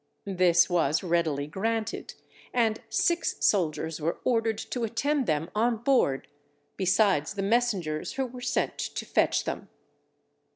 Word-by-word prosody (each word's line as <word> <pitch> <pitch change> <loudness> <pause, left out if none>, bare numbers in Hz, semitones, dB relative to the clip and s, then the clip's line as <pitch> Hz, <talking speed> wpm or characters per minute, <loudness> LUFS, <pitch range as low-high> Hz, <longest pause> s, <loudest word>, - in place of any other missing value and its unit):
This 180 -3 +4
was 165 -4 +1
readily 165 -5 0
granted, 220 +7 -3 0.4
and 225 -3 +2
six 340 -1 +1
soldiers 160 -4 +1
were 165 +3 -1
ordered 225 -3 +1
to 225 +2 -4
attend 265 +5 0
them 155 +2 -1
on 230 +2 +1
board, 225 - +1 0.5
besides 190 -3 +2
the 195 - -2
messengers 195 -8 0
who 265 0 -1
were 250 0 -9
sent - - -1
to - - -4
fetch - - +2
them. - - -5
205 Hz, 130 wpm, -27 LUFS, 165-230 Hz, 0.5 s, This